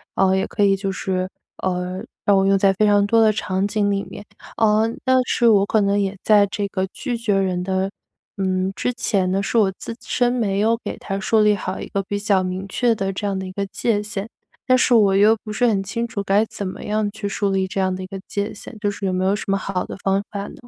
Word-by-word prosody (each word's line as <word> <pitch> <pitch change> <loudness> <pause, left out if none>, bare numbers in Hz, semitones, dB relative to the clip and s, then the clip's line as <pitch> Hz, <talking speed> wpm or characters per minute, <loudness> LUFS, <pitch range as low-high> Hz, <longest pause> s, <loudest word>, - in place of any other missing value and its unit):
嗯， 190 0 +3
也 190 - 0
可 210 - -1
以 195 -1 +4
就 195 0 -3
是， 185 -1 -2 0.3
呃， 180 0 -2 0.3
让 200 -1 +4
我 195 - +3
用 195 0 +4
在 195 0 +4
非 215 +3 +2
常 205 -1 +4
多 230 +2 +3
的 220 -1 +5
场 190 -1 -1
景 205 -1 0
里 200 0 0
面， - - -10 0.4
嗯， 220 +1 +3
但 260 0 +3
是 240 -1 +2
我 200 -3 +5
可 215 +1 +2
能 200 0 +2
也 200 -1 -1
在 210 -2 +5
这 205 -1 -2
个 190 -1 -2
拒 240 -2 -3
绝 225 -3 0
人 185 -2 0
的， 190 +1 -1 0.5
嗯， 190 -1 0
之 250 - -1
前 195 -6 0
呢， 195 +1 +1
是 200 - -1
我 205 -4 +4
自 230 - -6
身 245 -1 +1
没 210 -6 0
有 225 +2 +2
给 - - -4
他 195 -1 -4
树 220 +2 +2
立 210 -1 +4
好 185 -1 -4
一 - - -6
个 195 - -2
比 205 +1 -3
较 200 -2 +2
明 185 +1 -4
确 235 +4 +1
的 195 -3 -2
这 195 +2 -5
样 195 -1 -1
的 190 - -5
一 - - -7
个 200 +1 -3
界 205 +2 -1
限， 210 0 -5 0.4
但 255 0 +5
是 255 - +3
我 205 -4 +5
又 210 +3 +6
不 215 - -7
是 245 +3 +1
很 210 -5 +2
清 230 +5 -3
楚 210 -3 -4
该 200 +2 +3
怎 200 -2 -6
么 185 - -7
样 210 0 0
去 205 0 -5
树 200 0 -1
立 190 -1 0
这 195 +1 -2
样 185 -1 0
的 185 - -6
一 - - -7
个 195 +1 -7
界 205 +1 -3
限， 220 - -11
就 205 0 0
是 200 -1 -4
有 - - 0
没 185 0 0
有 195 +2 +2
什 210 - -6
么 195 0 +2
好 190 -1 -3
的 - - -8
方 195 0 +2
法 200 -1 -5
呢？ - - -10
200 Hz, 280 characters per minute, -21 LUFS, 190-215 Hz, 0.5 s, 又